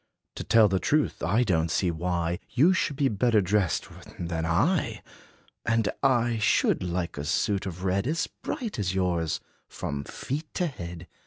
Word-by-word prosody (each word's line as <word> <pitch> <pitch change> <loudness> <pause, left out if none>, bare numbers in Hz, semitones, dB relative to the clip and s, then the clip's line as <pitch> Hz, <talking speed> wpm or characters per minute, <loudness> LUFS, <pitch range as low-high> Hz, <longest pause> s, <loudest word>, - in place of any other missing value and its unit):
To - - -5
tell 115 -2 +5
the 95 -1 +1
truth, 150 +7 +1
I 115 +4 +2
don 85 -7 +1
't - - -11
see 90 0 +1
why 85 0 -1
You 160 +9 +4
should 170 -6 0
be 140 0 +2
better 115 0 +3
dressed 100 -2 +1 0.3
than 80 -1 -2
I. 145 - +1 0.6
And 110 -2 +1
I 120 -4 +2
should 105 - +3
like 90 -3 -3
a - - -3
suit 95 +5 0
of 90 0 -6
red 95 +4 +1
As 160 +3 0
bright 225 - -5
as 95 -2 -1
yours, 85 -4 0 0.3
from 70 -1 -4
feet 150 - -5
to 180 - +1
head. 85 - -6
95 Hz, 170 wpm, -27 LUFS, 85-125 Hz, 0.6 s, tell